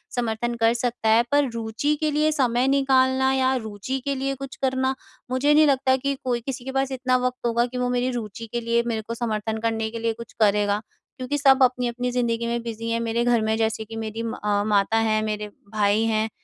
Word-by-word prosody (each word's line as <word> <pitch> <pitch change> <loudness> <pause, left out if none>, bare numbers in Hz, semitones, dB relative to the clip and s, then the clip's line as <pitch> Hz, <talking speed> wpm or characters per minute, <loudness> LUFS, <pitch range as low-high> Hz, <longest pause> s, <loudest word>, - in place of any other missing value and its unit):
समर्थन 240 0 -1
कर 230 0 +3
सकता 240 -2 -1
है, 225 +2 +5
पर 285 -2 +3
रुचि 230 +6 -1
के 305 -1 +1
लिए 305 +1 +2
समय 255 -3 +1
निकालना 265 -1 +3
या 265 0 +2
रुचि 220 +2 -4
के 280 -1 0
लिए 275 +1 -2
कुछ 270 0 -8
करना 260 0 0 0.4
मुझे 280 +3 +3
नहीं 305 +1 +6
लगता 265 -1 +3
कि 275 +1 -1
कोई 245 -2 -1
किसी 255 +1 -5
के 265 - -4
पास 270 0 0
इतना 255 -1 +1
वक़्त 250 -1 -6
होगा 235 0 +2
कि 250 +1 -6
वो 250 0 0
मेरी 250 +1 0
रुचि 230 -2 -6
के 240 - -1
लिए 235 0 +1
मेरे 225 -2 -1
को 230 - -3
समर्थन 220 -2 -2
करने 225 0 -1
के 230 - -5
लिए 230 0 0
कुछ 235 +1 -11
करेगा। 205 -1 +2 0.4
क्योंकि 260 +2 -2
सब 270 -1 +5
अपनी-अपनी 250 -1 0
ज़िंदगी 235 -1 0
में 235 0 -1
बिज़ी 230 0 -5
हैं, 230 - 0
मेरे 230 0 0
घर 240 -1 +3
में 220 0 +1
जैसे 220 0 0
कि 225 +1 -9
मेरी 225 0 -4
म 230 - -3
अ, 205 -1 +1
माता 210 +1 +2
हैं, 220 -1 +2
मेरे 210 -1 -3 0.3
भाई 210 0 +2
हैं 220 0 +1
235 Hz, 225 wpm, -24 LUFS, 225-260 Hz, 0.4 s, नहीं